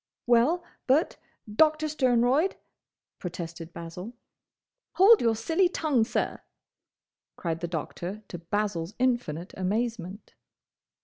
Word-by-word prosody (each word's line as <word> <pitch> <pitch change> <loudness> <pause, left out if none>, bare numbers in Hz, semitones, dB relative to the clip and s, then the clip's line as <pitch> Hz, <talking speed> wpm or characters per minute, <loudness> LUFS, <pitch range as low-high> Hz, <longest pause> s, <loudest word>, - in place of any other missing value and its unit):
"Well, 245 +9 +3 0.2
but, 280 +6 +2 0.3
Doctor 310 +8 +3
Sternroyd—" 260 +3 +2 0.6
protested 170 -1 -6
Basil. 170 +7 -8 0.8
"Hold 415 +4 +7
your 230 -1 +3
silly 325 - +2
tongue, 290 -10 +1
sir!" - - -2 0.9
cried 165 -2 -3
the 170 - -3
Doctor 175 +5 -5
to 175 - -6
Basil's 185 0 -2
infinite 240 -10 -1
amazement. 205 0 -3
225 Hz, 100 wpm, -27 LUFS, 175-265 Hz, 0.9 s, Hold